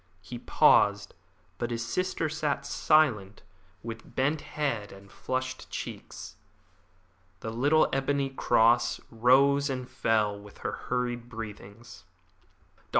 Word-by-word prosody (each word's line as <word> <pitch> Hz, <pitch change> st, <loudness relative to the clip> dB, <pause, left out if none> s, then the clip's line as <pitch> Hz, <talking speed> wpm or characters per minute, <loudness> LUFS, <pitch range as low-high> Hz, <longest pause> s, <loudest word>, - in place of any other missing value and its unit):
He 120 Hz, +3 st, -8 dB
paused, 100 Hz, -3 st, +3 dB, 0.5 s
but 120 Hz, -, -2 dB
his 115 Hz, -1 st, -3 dB
sister 175 Hz, +5 st, -1 dB
sat 150 Hz, -2 st, -2 dB
silent, 105 Hz, -12 st, +2 dB, 0.4 s
with 115 Hz, 0 st, -9 dB
bent 145 Hz, +4 st, +1 dB
head 135 Hz, -9 st, -3 dB
and 100 Hz, +1 st, -14 dB
flushed 130 Hz, 0 st, -4 dB
cheeks. -, -, -7 dB, 1.0 s
The 110 Hz, -, -4 dB
little 145 Hz, +7 st, +3 dB
ebony 135 Hz, 0 st, 0 dB
cross 120 Hz, -2 st, +3 dB
rose 135 Hz, +5 st, +4 dB
and 130 Hz, -2 st, -4 dB
fell 105 Hz, -4 st, 0 dB
with 100 Hz, 0 st, -14 dB
her -, -, 0 dB, 0.2 s
hurried 120 Hz, -1 st, -2 dB
breathings. 110 Hz, -2 st, -10 dB, 0.7 s
"Dr. -, -, -31 dB
120 Hz, 115 wpm, -28 LUFS, 110-140 Hz, 1.0 s, rose